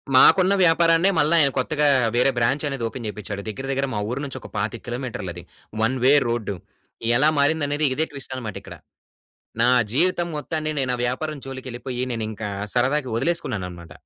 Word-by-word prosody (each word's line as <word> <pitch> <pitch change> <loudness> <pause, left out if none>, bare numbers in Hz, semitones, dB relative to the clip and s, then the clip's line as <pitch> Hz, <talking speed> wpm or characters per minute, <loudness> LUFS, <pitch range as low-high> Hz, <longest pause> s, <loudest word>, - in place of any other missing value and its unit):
మాకున్న 185 +8 +6
వ్యాపారాన్నే 165 +1 +4
మల్ల 150 +1 +3
ఆయన 145 -4 +5
కొత్తగా 150 +3 +1 0.3
వేరే 125 +3 +4
బ్రాంచనేది 135 +1 0
ఓపెన్ 120 +1 -7
చేపిచ్చాడు. 105 -1 -5
దెగ్గిర 110 +5 -5
దెగ్గిర 135 0 0
మా 105 - -1
ఊరు 130 +3 -3
నుంచి 135 -1 -6
ఒక - - -10
25 110 +3 -3
కిలోమీటర్లది. 120 -9 -5 0.4
One 125 +4 +1
way 135 +2 +6
road. 115 -4 -2 0.6
ఎలా 150 +4 +4
మారిందనేది 145 0 +1
ఇదే 155 +4 +1
ట్విస్టనమాటిక్కడ. 130 -6 -6 0.9
నా 120 - +5 0.2
జీవితం 175 +4 +1
మొత్తాన్ని 155 +1 -3
నేను 130 -2 0
ఆ - - -4
వ్యాపారం 150 +5 -3
జోలికెళ్ళిపోయి 130 -1 -5
నేనింకా 110 -2 -4 0.3
సరదాగా 130 +2 +1
ఒదిలేసుకున్నాననమాట. 90 - -2
130 Hz, 145 wpm, -23 LUFS, 115-150 Hz, 0.9 s, మాకున్న